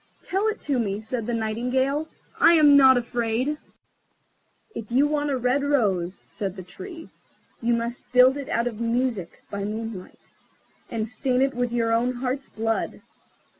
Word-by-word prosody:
"Tell 390 +4 0
it 435 0 -1
to 280 -3 0
me," 205 -3 -1
said 220 +1 -4
the 240 - -1
Nightingale, 250 +7 0 0.3
"I 335 - +7
am 300 -3 +7
not 265 -2 +7
afraid." 240 +4 -1 1.1
"If 225 0 -7
you 265 +4 +4
want 295 0 0
a 270 - 0
red 250 +3 +1
rose," 200 -11 0
said 195 -4 -5
the 185 - -8
Tree, 325 - -10 0.5
"you 235 0 +2
must 235 +1 -4
build 255 +1 +6
it 280 -2 -6
out 235 +1 +1
of 230 -3 -4
music 235 -5 -1
by 200 0 -3
moonlight, 215 -2 -6 0.6
and 225 -1 -2
stain 250 +3 0
it 270 0 +1
with 245 -1 -1
your 230 -1 +1
own 240 +2 +2
heart's 260 +2 -3
blood. 225 0 -2
245 Hz, 165 wpm, -25 LUFS, 225-270 Hz, 1.1 s, I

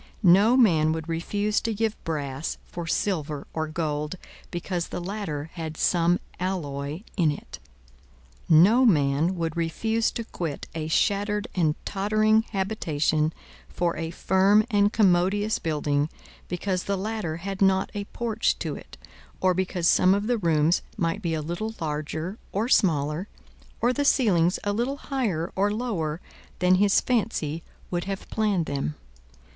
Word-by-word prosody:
No 215 +7 +5
man 160 -10 +4
would 160 0 -5
refuse 205 +6 -1
to 225 -2 -2
give 220 0 0
brass 145 -2 -3
for 170 -1 -7
silver 155 -6 -1
or 160 -1 -2
gold, 155 0 -2 0.3
because 175 0 -3
the - - -5
latter 175 -5 -4
had 160 -3 -6
some 175 0 +2 0.2
alloy 155 -3 -3
in 170 -5 +4
it. 145 - -6 0.9
No 195 +11 +6
man 155 - +3
would 165 -2 -2
refuse 220 +7 0
to 230 - -3
quit 165 -9 -5
a 160 -1 -3
shattered 205 +5 +1
and 160 -5 +2
tottering 215 +2 +2
habitation 160 -7 0 0.4
for 170 - -1
a 165 -1 -3
firm 195 +5 +3
and 205 -1 +4
commodious 205 +1 +2
building, 150 -2 0 0.4
because 180 +1 -2
the 200 0 0
latter 205 -5 -3
had 195 +3 -6
not 190 -1 +3
a 205 -1 -4
porch 225 +1 -1
to - - -3
it, - - -12 0.4
or 185 -1 +3
because 180 -1 0
some 185 +2 +5
of 205 +1 -1
the 240 0 +1
rooms 165 -2 +2 0.2
might 165 +4 -1
be 170 -4 -1
a 155 - -3
little 195 +8 -4
larger 155 +5 -4
or 210 +4 0
smaller, 160 - +2 0.5
or 245 +2 +2
the 285 - 0
ceilings 190 -11 +3
a 205 - 0
little 245 +6 -1
higher 225 - -2
or 200 +2 +2
lower 190 -9 -2 0.4
than 180 0 +3
his 205 -1 +4
fancy 200 - -1 0.3
would 175 -1 -1
have 195 0 -5
planned 205 -6 +1
them. 140 - -3
180 Hz, 150 wpm, -26 LUFS, 160-205 Hz, 0.9 s, No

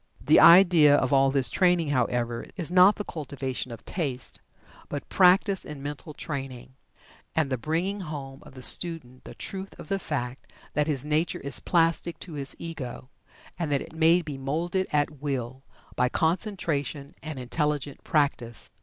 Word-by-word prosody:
The - - +4
idea 170 -4 +7
of 130 -1 +1
all 135 0 +5
this 135 -2 +1
training, 175 -4 +2
however, 120 -3 -1
is 175 -3 -3
not 185 +3 +6
the 210 - -4
cultivation 135 -6 -5
of 115 - -10
taste, 135 -8 -4 0.5
but 145 - -5
practice 190 +1 +4
in 150 -2 -7
mental 145 +1 -7
training, 135 -5 -6 0.6
and 155 -4 +1
the 130 - 0
bringing 170 - -2
home 140 -6 -7
to 150 - -13
the 130 -2 -10
student 155 -8 +1
the - - -10
truth 195 0 -7
of - - -10
the 195 -1 0
fact 130 -7 -5 0.2
that 150 +1 +1
his 145 -3 -1
nature 155 +3 0
is 140 0 0
plastic 165 0 +1
to 175 - -8
his 140 -2 +2
Ego, 140 -5 -7 0.5
and 165 -4 -2
that 140 - +1
it - - -13
may 165 +2 +4
be 145 -4 -7
moulded 170 +7 -1
at 145 -1 -1
will, 130 -3 -3 0.3
by 125 - +2
concentration 160 - -1
and 155 -2 -6
intelligent 145 +2 -2
practice. 140 -6 -1
150 Hz, 165 wpm, -26 LUFS, 135-170 Hz, 0.6 s, idea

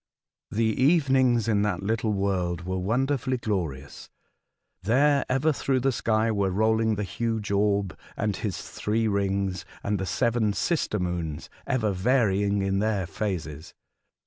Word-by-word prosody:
The 110 0 +1
evenings 130 -6 +3
in 105 -3 +2
that 100 -3 -1
little 110 +1 0
world 90 -4 -1
were 95 0 -2
wonderfully 130 +6 0
glorious. 80 - -4 0.7
There, 140 +7 +3
ever 135 +4 +2
through 130 -1 0
the 135 +2 +2
sky, 110 -2 +1
were 100 -2 +1
rolling 110 +3 +2
the 105 - -2
huge 110 +2 -3
orb 100 -1 +1 0.2
and 105 -2 0
his 100 -5 -3
three 110 +2 -1
rings, 100 -3 -1 0.2
and 100 -1 -1
the 95 - -3
seven 115 0 +1
sister 155 - 0
moons 85 -4 -3 0.2
ever 120 -6 +1
varying 100 -2 +1
in 95 0 0
their 105 -3 0
phases. 85 -6 -5
105 Hz, 140 wpm, -26 LUFS, 95-115 Hz, 0.7 s, evenings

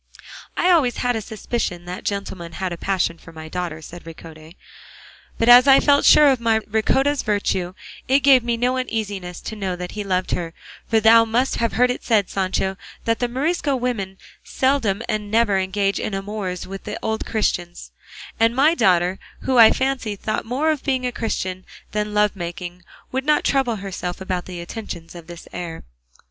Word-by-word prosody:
"I 365 - +3
always 285 -9 +3
had 245 -1 0
a 220 - -2
suspicion 210 -5 -4
that 180 +1 -7
gentleman 190 -4 -4
had 185 +1 -3
a - - -4
passion 175 -2 -1
for - - -14
my 160 -1 -9
daughter," 165 -2 -5
said 175 +3 -10
Ricote; 160 0 -12 0.8
"but 230 - +1
as 245 +2 +9
I 270 -1 +8
felt 285 -1 +3
sure 300 - +8
of 260 - 0
my 225 -1 +2
Ricota's 265 +7 +1
virtue 190 -3 -1 0.3
it 270 +2 +4
gave 265 -3 +6
me 235 -1 -1
no 250 +2 +1
uneasiness 205 -8 -4
to 220 - -6
know 190 -3 -3
that 180 0 -6
he 210 - -4
loved 185 -2 -1
her; 170 -2 -3 0.3
for 225 - +3
thou 225 +1 +7
must 235 +4 0
have 230 - 0
heard 250 +1 +3
it - - -5
said, 210 -5 +1
Sancho, 190 0 -1 0.3
that 230 0 +1
the 245 - +1
Morisco 285 +3 0
women 225 -7 -3 0.3
seldom 240 -6 0
or 215 -1 0
never 210 -1 +1
engage 195 +1 0
in 200 - -3
amours 195 -2 -4
with 195 +1 -8
the 210 - -5
old 220 0 -1
Christians; 175 -5 -2 0.5
and 230 +1 +3
my 290 +5 +4
daughter, 180 - +2 0.2
who 260 -2 +2
I 225 -1 +10
fancy 260 -5 -1
thought 215 +2 -3
more 275 +7 +1
of 300 -3 -3
being 260 -3 0
a 250 - -1
Christian 185 -6 -3 0.3
than 210 0 -1
of 210 - -8
lovemaking, 180 -3 -2 0.3
would 265 +1 -1
not 300 +1 +2
trouble 265 -4 +1
herself 190 -3 -5
about 185 -2 -3
the 180 -2 -7
attentions 170 -3 -7
of 170 -2 -11
this 175 -1 -11
heir." 170 -2 -6
210 Hz, 185 wpm, -21 LUFS, 180-245 Hz, 0.8 s, I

